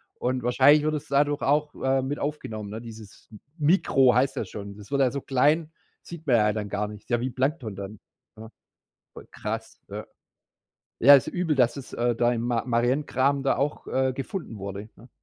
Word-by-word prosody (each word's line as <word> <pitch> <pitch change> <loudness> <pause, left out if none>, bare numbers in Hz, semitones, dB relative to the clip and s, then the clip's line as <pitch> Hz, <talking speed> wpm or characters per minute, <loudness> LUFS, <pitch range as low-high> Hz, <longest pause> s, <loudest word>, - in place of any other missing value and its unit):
Und 125 0 -2
wahrscheinlich 140 +5 +5
wird 155 0 0
es 150 - -4
dadurch 145 +1 +1
auch, 150 +2 +1
äh, 135 0 +2
mit 145 +2 -3
aufgenommen, 110 -8 -4
ne, 110 +2 -6
dieses 110 -3 -12 0.3
Mikro 145 -5 +4
heißt 130 +2 +1
das - - -3
schon. 100 -1 -8
Das 105 +4 -13
wird 140 -1 +1
halt 130 -3 +2
so 140 - -3
klein, 150 +5 +1 0.3
sieht 165 -3 -10
man 125 - +4
ja 105 -1 +2
dann 105 -2 -4
gar 105 +1 -2
nicht. 105 +2 -12
Ja, 120 - +2
wie 130 +2 -2
Plankton 130 -5 -2
dann, 100 +2 -8 0.4
ne? 110 0 -11 0.8
Krass, 110 +1 -6
ja. - - -7 0.9
Ja, 140 +4 +9
ist 135 - +1
übel, 175 -4 -1
dass 125 -2 +3
es, 140 -2 -9
äh, 120 0 0
da 120 0 +2
im 115 -1 -2
Ma 120 -2 0
Mariengraben 130 +3 +1
da 135 - +1
auch, 145 +2 -2
äh, 130 0 0
gefunden 135 - -6
wurde, 100 +2 -7
ne? 120 +3 -17
130 Hz, 195 wpm, -26 LUFS, 110-140 Hz, 0.9 s, Ja